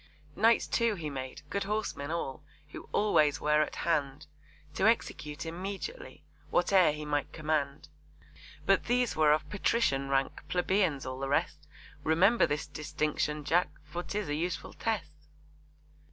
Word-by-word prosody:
Knights, 225 Hz, +3 st, +4 dB
too, 230 Hz, -2 st, +1 dB
he 155 Hz, -5 st, -5 dB
made, 130 Hz, -1 st, -6 dB
good 200 Hz, -1 st, -1 dB
horsemen 205 Hz, -8 st, -2 dB
all, 155 Hz, -3 st, -3 dB, 0.3 s
Who -, -, -10 dB
always 155 Hz, -9 st, +3 dB
were 150 Hz, 0 st, +3 dB
at 155 Hz, -, -2 dB
hand 150 Hz, -3 st, 0 dB, 0.5 s
To 190 Hz, -, +2 dB
execute 150 Hz, -10 st, -1 dB
immediately 195 Hz, -, -6 dB, 0.3 s
Whate'er 180 Hz, -1 st, +4 dB
he 150 Hz, 0 st, -6 dB
might 145 Hz, -1 st, -1 dB
command. 150 Hz, -2 st, -2 dB, 0.8 s
But -, -, +3 dB
these 245 Hz, 0 st, +1 dB
were 155 Hz, -1 st, +5 dB
of 155 Hz, 0 st, +2 dB
Patrician 150 Hz, -10 st, +1 dB
rank, 135 Hz, 0 st, 0 dB
Plebeians 180 Hz, -6 st, +1 dB
all 130 Hz, 0 st, -5 dB
the 135 Hz, 0 st, -3 dB
rest; 150 Hz, +1 st, -1 dB, 0.4 s
Remember 185 Hz, +9 st, +4 dB
this 145 Hz, 0 st, -2 dB
distinction, 150 Hz, 0 st, -2 dB
Jack! 170 Hz, +4 st, +2 dB
For 150 Hz, +4 st, -5 dB
'tis 205 Hz, +1 st, -3 dB
a 145 Hz, -, -1 dB
useful 170 Hz, +3 st, -3 dB
test. 155 Hz, -9 st, -4 dB
155 Hz, 140 wpm, -30 LUFS, 145-195 Hz, 0.8 s, were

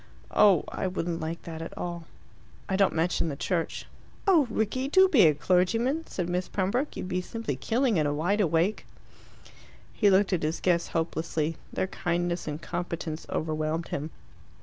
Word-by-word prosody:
"Oh, 200 Hz, -6 st, +5 dB
I -, -, -2 dB
wouldn't 175 Hz, -2 st, -2 dB
like 160 Hz, +1 st, -4 dB
that 160 Hz, -1 st, -7 dB
at 165 Hz, -, -7 dB
all." 170 Hz, -1 st, -4 dB, 0.6 s
"I 190 Hz, -, 0 dB
don't 195 Hz, -3 st, +3 dB
mention 165 Hz, 0 st, +1 dB
the 140 Hz, -, -4 dB
Church." 165 Hz, +3 st, -2 dB, 0.4 s
"Oh, 340 Hz, -, +5 dB
Rickie, 220 Hz, +5 st, -1 dB
do 375 Hz, +6 st, +6 dB
be 240 Hz, -, +6 dB
a 150 Hz, -, +3 dB
clergyman!" 225 Hz, -, +1 dB
said 180 Hz, -3 st, -3 dB
Miss 180 Hz, +1 st, -1 dB
Pembroke. 205 Hz, +9 st, -1 dB
"You'd -, -, -4 dB
be 180 Hz, 0 st, -1 dB
simply 225 Hz, -, -4 dB
killing 230 Hz, -, +1 dB
in 155 Hz, -2 st, +2 dB
a -, -, 0 dB
wide 190 Hz, +8 st, +1 dB
awake." 175 Hz, +3 st, +1 dB, 1.1 s
He 205 Hz, -, +3 dB
looked 195 Hz, +1 st, +3 dB
at 175 Hz, -, +1 dB
his 155 Hz, +2 st, -1 dB
guests 175 Hz, -2 st, +1 dB
hopelessly. 160 Hz, -1 st, -1 dB, 0.2 s
Their -, -, -1 dB
kindness 175 Hz, -2 st, -2 dB
and 150 Hz, 0 st, -3 dB
competence 170 Hz, -2 st, -4 dB
overwhelmed 155 Hz, +1 st, -2 dB
him. 150 Hz, +2 st, -3 dB
175 Hz, 170 wpm, -28 LUFS, 160-205 Hz, 1.1 s, do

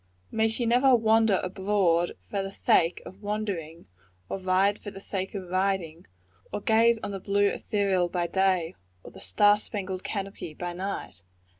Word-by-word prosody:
May 220 Hz, 0 st, +2 dB
she 225 Hz, +2 st, -2 dB
never 250 Hz, +3 st, +5 dB
wander 220 Hz, -3 st, +3 dB
abroad 185 Hz, -2 st, +1 dB
for 200 Hz, -, -3 dB
the 195 Hz, 0 st, -5 dB
sake 170 Hz, -3 st, +2 dB
of 190 Hz, +3 st, -12 dB
wandering, 200 Hz, -6 st, -4 dB, 0.4 s
or -, -, -3 dB
ride 190 Hz, +2 st, +2 dB
for 205 Hz, -, -7 dB
the 195 Hz, -1 st, -10 dB
sake 195 Hz, 0 st, -4 dB
of 185 Hz, -3 st, -6 dB
riding; 185 Hz, -3 st, -1 dB, 0.4 s
or -, -, -3 dB
gaze 225 Hz, +2 st, +4 dB
on -, -, -3 dB
the 195 Hz, -, -4 dB
blue 200 Hz, +1 st, +1 dB
ethereal 195 Hz, -5 st, 0 dB
by 175 Hz, -1 st, -1 dB
day, 185 Hz, -2 st, +1 dB, 0.3 s
or -, -, -11 dB
the -, -, -13 dB
star 205 Hz, -, +3 dB
spangled 190 Hz, -3 st, -5 dB
canopy 195 Hz, -6 st, -5 dB
by 175 Hz, +1 st, -4 dB
night? 175 Hz, -, -5 dB
195 Hz, 165 wpm, -27 LUFS, 180-205 Hz, 0.4 s, never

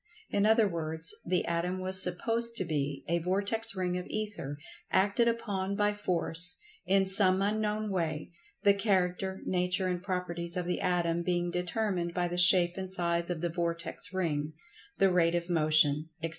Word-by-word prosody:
In 205 Hz, +1 st, +2 dB
other 220 Hz, -1 st, +4 dB
words, 160 Hz, -2 st, -2 dB
the 180 Hz, +1 st, +1 dB
Atom 175 Hz, +2 st, -2 dB
was 185 Hz, 0 st, +4 dB
supposed 230 Hz, +6 st, +2 dB
to 190 Hz, -, -1 dB
be 145 Hz, -4 st, -3 dB
a 170 Hz, +1 st, 0 dB
vortex 200 Hz, +5 st, +1 dB
ring 180 Hz, -1 st, -2 dB
of 180 Hz, -, -8 dB
Ether, 205 Hz, -10 st, -5 dB, 0.3 s
acted 205 Hz, +5 st, +2 dB
upon 200 Hz, -4 st, -2 dB
by 205 Hz, 0 st, +1 dB
Force, 175 Hz, -3 st, -2 dB, 0.3 s
in 195 Hz, 0 st, +3 dB
some 190 Hz, -1 st, +4 dB
unknown 210 Hz, +1 st, -1 dB
way, 160 Hz, -4 st, -3 dB, 0.3 s
the 200 Hz, -, +6 dB
character, 190 Hz, -2 st, -1 dB
nature 180 Hz, +1 st, 0 dB
and 180 Hz, -1 st, -2 dB
properties 180 Hz, -2 st, -2 dB
of 180 Hz, -, -2 dB
the 180 Hz, -, -2 dB
Atom 175 Hz, -2 st, 0 dB
being 175 Hz, 0 st, -1 dB
determined 180 Hz, -1 st, -2 dB
by 180 Hz, -1 st, 0 dB
the 175 Hz, +1 st, -2 dB
shape 180 Hz, -1 st, +6 dB
and 190 Hz, -1 st, -4 dB
size 170 Hz, -2 st, -1 dB
of 170 Hz, -3 st, -3 dB
the 175 Hz, -, -1 dB
vortex 170 Hz, +3 st, -2 dB
ring; 155 Hz, -5 st, -2 dB, 0.4 s
the 195 Hz, -1 st, +3 dB
rate 170 Hz, -1 st, +2 dB
of 170 Hz, +1 st, -3 dB
motion; 155 Hz, -1 st, +2 dB
etc. 165 Hz, -, -1 dB
180 Hz, 170 wpm, -29 LUFS, 170-195 Hz, 0.4 s, the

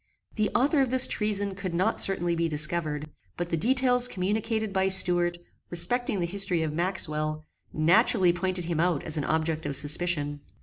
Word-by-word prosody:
The 215 Hz, -1 st, -1 dB
author 275 Hz, +4 st, +2 dB
of 265 Hz, -, 0 dB
this 255 Hz, 0 st, +7 dB
treason 205 Hz, -2 st, -2 dB
could 190 Hz, -3 st, -6 dB
not 180 Hz, +2 st, 0 dB
certainly 175 Hz, -3 st, +3 dB
be 170 Hz, 0 st, -1 dB
discovered; 155 Hz, 0 st, -1 dB, 0.3 s
but 175 Hz, 0 st, -4 dB
the 165 Hz, -, -1 dB
details 250 Hz, +6 st, +2 dB
communicated 215 Hz, +2 st, -3 dB
by 190 Hz, 0 st, 0 dB
Stuart, 175 Hz, -2 st, +2 dB, 0.3 s
respecting 195 Hz, +5 st, +1 dB
the 175 Hz, -, -1 dB
history 185 Hz, -2 st, 0 dB
of 155 Hz, -1 st, -4 dB
Maxwell, 155 Hz, -3 st, -2 dB, 0.3 s
naturally 180 Hz, +3 st, +2 dB
pointed 185 Hz, 0 st, -2 dB
him 165 Hz, -2 st, -3 dB
out 170 Hz, -3 st, 0 dB
as 155 Hz, -, -1 dB
an 145 Hz, -, -4 dB
object 160 Hz, 0 st, -2 dB
of 140 Hz, -2 st, -3 dB
suspicion. 145 Hz, -1 st, +1 dB
175 Hz, 170 wpm, -26 LUFS, 160-200 Hz, 0.3 s, this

